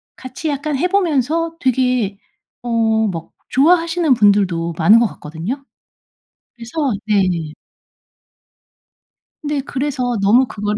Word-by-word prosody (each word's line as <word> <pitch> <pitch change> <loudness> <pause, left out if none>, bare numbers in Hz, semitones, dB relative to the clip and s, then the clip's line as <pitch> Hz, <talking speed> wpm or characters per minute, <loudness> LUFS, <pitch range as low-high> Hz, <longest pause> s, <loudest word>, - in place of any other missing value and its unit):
같이 260 +5 -6
약간 290 0 -2
해 350 - +1
보면서 330 -3 0
되게 250 -6 0 0.4
어 245 - -6 0.4
막 165 -2 -7 0.2
좋아하시는 330 +1 +3
분들도 195 -7 +2
많은 205 +8 +6
것 235 - +3
같거든요. 180 - -7 0.9
그래서 230 0 -11 0.3
네. 185 -7 0 1.9
네. 295 -1 -1
그래서 260 -3 -2
너무 225 +7 +4
그거를 210 -1 -3
250 Hz, 225 characters per minute, -18 LUFS, 205-290 Hz, 1.9 s, 많은